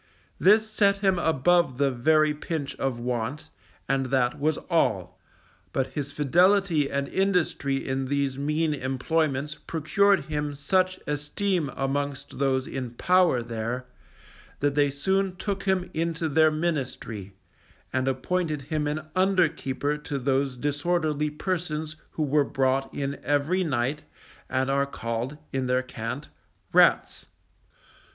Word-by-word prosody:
This 215 Hz, +3 st, +5 dB
set 200 Hz, -2 st, +3 dB
him 190 Hz, -2 st, +3 dB
above 160 Hz, -2 st, +2 dB
the 140 Hz, -1 st, +2 dB
very 155 Hz, +4 st, +3 dB
pinch 150 Hz, -2 st, -4 dB
of 135 Hz, -3 st, -1 dB
want, 125 Hz, +3 st, -3 dB, 0.4 s
and 135 Hz, -1 st, +1 dB
that 130 Hz, +2 st, +1 dB
was 155 Hz, +1 st, +1 dB
all; 95 Hz, -, 0 dB, 0.5 s
but 130 Hz, 0 st, -1 dB
his 145 Hz, -1 st, -3 dB
fidelity 170 Hz, +1 st, +3 dB
and 140 Hz, 0 st, -1 dB
industry 180 Hz, -8 st, 0 dB
in 135 Hz, 0 st, -1 dB
these 140 Hz, 0 st, 0 dB
mean 150 Hz, +3 st, 0 dB
employments 140 Hz, +2 st, -1 dB
procured 190 Hz, +6 st, +3 dB
him 150 Hz, -2 st, -3 dB
such 185 Hz, +6 st, +1 dB
esteem 150 Hz, +3 st, -1 dB
amongst 140 Hz, 0 st, -3 dB
those 135 Hz, -1 st, +1 dB
in 125 Hz, -3 st, -5 dB
power 180 Hz, -6 st, +3 dB
there, 115 Hz, +2 st, -4 dB, 0.7 s
that 145 Hz, 0 st, +1 dB
they 145 Hz, 0 st, +3 dB
soon 190 Hz, +7 st, 0 dB
took 195 Hz, +1 st, -3 dB
him 190 Hz, -2 st, 0 dB
into 165 Hz, 0 st, -1 dB
their 155 Hz, +1 st, +4 dB
ministry, 130 Hz, -, -3 dB, 0.6 s
and 130 Hz, +1 st, 0 dB
appointed 155 Hz, +2 st, -1 dB
him 150 Hz, +1 st, -2 dB
an 150 Hz, +1 st, -2 dB
under 185 Hz, -2 st, +4 dB
keeper 145 Hz, -1 st, -2 dB
to 145 Hz, -1 st, -4 dB
those 135 Hz, 0 st, 0 dB
disorderly 150 Hz, +2 st, 0 dB
persons 155 Hz, -1 st, -3 dB, 0.2 s
who 155 Hz, -, -1 dB
were 145 Hz, 0 st, +3 dB
brought 135 Hz, 0 st, 0 dB
in 140 Hz, 0 st, -3 dB
every 145 Hz, +6 st, +1 dB
night 140 Hz, -1 st, -1 dB, 0.5 s
and 130 Hz, +1 st, 0 dB
are 140 Hz, 0 st, +2 dB
called, 115 Hz, +2 st, -4 dB, 0.2 s
in 130 Hz, -1 st, -1 dB
their 125 Hz, +1 st, +2 dB
cant, 125 Hz, +3 st, -6 dB, 0.4 s
"rats." -, -, +4 dB
145 Hz, 130 wpm, -26 LUFS, 135-165 Hz, 0.7 s, This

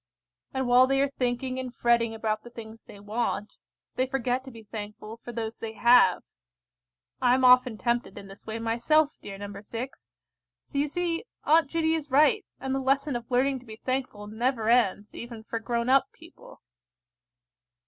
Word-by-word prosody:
And 265 Hz, -1 st, -2 dB
while 250 Hz, +1 st, +6 dB
they 270 Hz, 0 st, +2 dB
are 280 Hz, 0 st, +1 dB
thinking 255 Hz, 0 st, -2 dB
and 255 Hz, -1 st, -5 dB
fretting 235 Hz, -1 st, +2 dB
about 220 Hz, -1 st, -2 dB
the 240 Hz, -, -11 dB
things 225 Hz, -1 st, -11 dB
they 205 Hz, -, -13 dB
want, 210 Hz, 0 st, -3 dB, 0.4 s
they 255 Hz, -, +1 dB
forget 255 Hz, -1 st, -1 dB
to -, -, -8 dB
be 230 Hz, -3 st, -12 dB
thankful 215 Hz, 0 st, -8 dB
for 235 Hz, +1 st, -10 dB
those 225 Hz, -1 st, -5 dB
they 225 Hz, -1 st, -5 dB
have. 235 Hz, -5 st, +5 dB, 1.0 s
I 250 Hz, 0 st, +5 dB
am 260 Hz, 0 st, +2 dB
often 250 Hz, -2 st, +6 dB
tempted 240 Hz, +1 st, -1 dB
in 195 Hz, -, -9 dB
this 195 Hz, +1 st, -13 dB
way 220 Hz, 0 st, -5 dB
myself, 240 Hz, +7 st, +2 dB
dear 195 Hz, -1 st, -8 dB
No. 200 Hz, 0 st, -8 dB
6; 235 Hz, +5 st, -8 dB, 0.5 s
so 280 Hz, -, -8 dB
you 290 Hz, -, +2 dB
see 340 Hz, +3 st, -2 dB, 0.2 s
Aunt 315 Hz, -1 st, +4 dB
Judy 325 Hz, 0 st, +1 dB
is 310 Hz, -3 st, -2 dB
right, 285 Hz, +1 st, +4 dB, 0.2 s
and 265 Hz, 0 st, -3 dB
the 270 Hz, -, 0 dB
lesson 275 Hz, +1 st, +1 dB
of 240 Hz, -1 st, -5 dB
learning 265 Hz, +2 st, +1 dB
to 250 Hz, -, -18 dB
be 220 Hz, -, -8 dB
thankful 255 Hz, -5 st, -2 dB
never 225 Hz, +1 st, -1 dB
ends, 215 Hz, -4 st, +2 dB
even 235 Hz, -2 st, -8 dB
for 230 Hz, +1 st, -4 dB
grown 235 Hz, +1 st, -2 dB
up 265 Hz, +1 st, +4 dB
people. -, -, -16 dB
245 Hz, 180 wpm, -27 LUFS, 225-265 Hz, 1.0 s, while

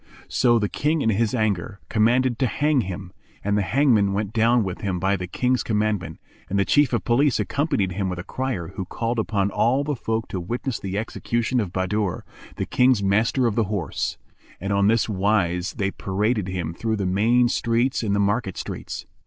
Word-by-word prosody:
"[FN#391] -, -, -19 dB
So 120 Hz, -2 st, +4 dB
the 105 Hz, -2 st, +1 dB
King 155 Hz, +2 st, 0 dB
in 115 Hz, -, +2 dB
his 110 Hz, +3 st, +1 dB
anger, 105 Hz, -3 st, -1 dB
commanded 120 Hz, +3 st, +2 dB
to 130 Hz, -, +2 dB
hang 145 Hz, +1 st, +2 dB
him; 95 Hz, -2 st, -6 dB, 0.3 s
and 105 Hz, 0 st, +1 dB
the 105 Hz, -, +2 dB
hangman 110 Hz, -3 st, +3 dB
went 105 Hz, +1 st, -2 dB
down 115 Hz, +1 st, +3 dB
with 95 Hz, -2 st, -5 dB
him 95 Hz, -3 st, -2 dB
by 95 Hz, +2 st, +1 dB
the 90 Hz, -1 st, -5 dB
King's 125 Hz, +7 st, 0 dB
commandment, 105 Hz, -7 st, -1 dB, 0.3 s
and 100 Hz, -, 0 dB
the 100 Hz, -, +2 dB
Chief 145 Hz, -3 st, +3 dB
of 120 Hz, -6 st, 0 dB
Police 130 Hz, +5 st, +2 dB
accompanied 140 Hz, -, 0 dB
him 95 Hz, +1 st, -2 dB
with 90 Hz, -, -4 dB
a 85 Hz, -, -5 dB
crier 125 Hz, -9 st, -3 dB
who 95 Hz, -, -5 dB
called 115 Hz, +5 st, -2 dB
upon 100 Hz, -2 st, 0 dB
all 130 Hz, +8 st, +2 dB
the 145 Hz, 0 st, -2 dB
folk 115 Hz, -1 st, -2 dB
to 95 Hz, -, -3 dB
witness 120 Hz, +7 st, -3 dB
the 95 Hz, 0 st, -4 dB
execution 120 Hz, +3 st, -1 dB
of 100 Hz, -6 st, -2 dB
Bahadur, 95 Hz, +1 st, -1 dB, 0.3 s
the -, -, -2 dB
King's 125 Hz, -5 st, +3 dB
Master 110 Hz, +6 st, +2 dB
of 115 Hz, -, +2 dB
the 115 Hz, 0 st, +1 dB
Horse; 95 Hz, -6 st, -3 dB, 0.4 s
and 100 Hz, +2 st, -2 dB
on 100 Hz, 0 st, +3 dB
this 115 Hz, +1 st, +3 dB
wise 95 Hz, -3 st, 0 dB
they 100 Hz, -1 st, -1 dB
paraded 105 Hz, +2 st, -1 dB
him 90 Hz, -3 st, -3 dB
through 110 Hz, +5 st, -2 dB
the 100 Hz, -2 st, -2 dB
main 115 Hz, +6 st, +3 dB
streets 120 Hz, +2 st, +1 dB
and 105 Hz, -3 st, 0 dB
the -, -, +1 dB
market 100 Hz, -1 st, 0 dB
streets. -, -, -6 dB
105 Hz, 200 wpm, -23 LUFS, 95-120 Hz, 0.4 s, So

